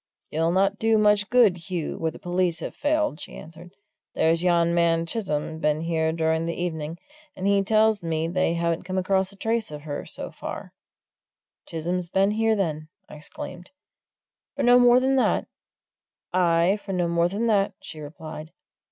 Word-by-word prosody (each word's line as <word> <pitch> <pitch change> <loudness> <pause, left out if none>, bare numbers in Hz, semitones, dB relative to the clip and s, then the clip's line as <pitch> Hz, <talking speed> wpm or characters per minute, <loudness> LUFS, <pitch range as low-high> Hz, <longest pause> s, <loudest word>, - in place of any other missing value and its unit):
"You'll 165 +2 +1
not 195 +3 +1
do 225 0 +3
much 210 -1 +3
good, 205 -9 +3
Hugh, 175 -4 -3
where 165 - 0
the - - -10
police 175 -2 -1
have - - -5
failed," 300 - 0
she - - -9
answered. 165 +4 -12 0.4
"There's 165 +1 +2
yon 170 -1 +3
man 170 -1 +2
Chisholm 160 -5 -3
been 150 0 +1
here 160 -1 0
during 160 0 0
the 170 - -4
evening, 160 -2 -3 0.4
and 185 - -5
he 200 0 +3
tells 215 -1 +3
me 160 -1 -1
they 175 -1 0
haven't 170 0 0
come 185 0 -4
across 190 +1 +1
a - - -13
trace 225 +1 -1
of 150 -1 -8
her, 145 -2 -5
so - - -5
far." - - -7 0.9
"Chisholm's 170 +2 -3
been 195 +3 +2
here, 220 +1 +2
then?" 155 -6 -2 0.2
I - - -11
exclaimed. 175 +4 -9 0.9
"For 280 - -2
no 245 0 +6
more 245 0 +6
than 265 +1 +2
that?" 260 - +2 0.9
"Aye, 175 +2 +3
for 195 - -5
no 175 -2 +1
more 170 0 +2
than 205 +5 -2
that," 200 -3 +2
she 155 - -10
replied. 155 +1 -8
175 Hz, 175 wpm, -25 LUFS, 165-200 Hz, 0.9 s, no